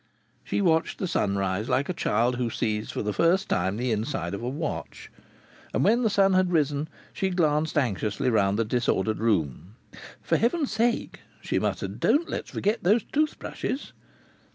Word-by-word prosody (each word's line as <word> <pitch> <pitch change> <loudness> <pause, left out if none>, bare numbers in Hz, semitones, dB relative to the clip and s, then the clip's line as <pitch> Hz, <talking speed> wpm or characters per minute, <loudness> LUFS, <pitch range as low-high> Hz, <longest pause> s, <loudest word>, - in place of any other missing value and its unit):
She - - -1
watched 165 -3 +2
the 190 - -2
sunrise 100 - 0
like 140 - +1
a 185 - -1
child 120 -4 +1
who 120 -2 -1
sees 110 -1 -2
for - - -3
the 105 0 -1
first 175 - +2
time 95 +3 0
the 125 +1 -1
inside 105 -5 -2
of 100 - -4
a 120 - -2
watch. 150 +4 -5 0.6
And - - +2
when 230 +5 +4
the 225 - +2
sun 195 -1 +3
had 185 -1 +3
risen 150 -2 +1 0.3
she 190 - -1
glanced 155 -4 +1
anxiously 115 -1 0
round 100 -2 +2
the 115 - +1
disordered 110 -3 0
room. 95 - -1 0.5
"For - - +2
heaven's 275 +5 +1
sake," 230 +2 0 0.2
she - - -1
muttered, - - -3
"don't 320 +4 +3
let's - - -4
forget 210 +3 -1
these 210 +6 +4
tooth 305 +1 0
brushes!" 270 - -5
135 Hz, 175 wpm, -26 LUFS, -, 0.6 s, when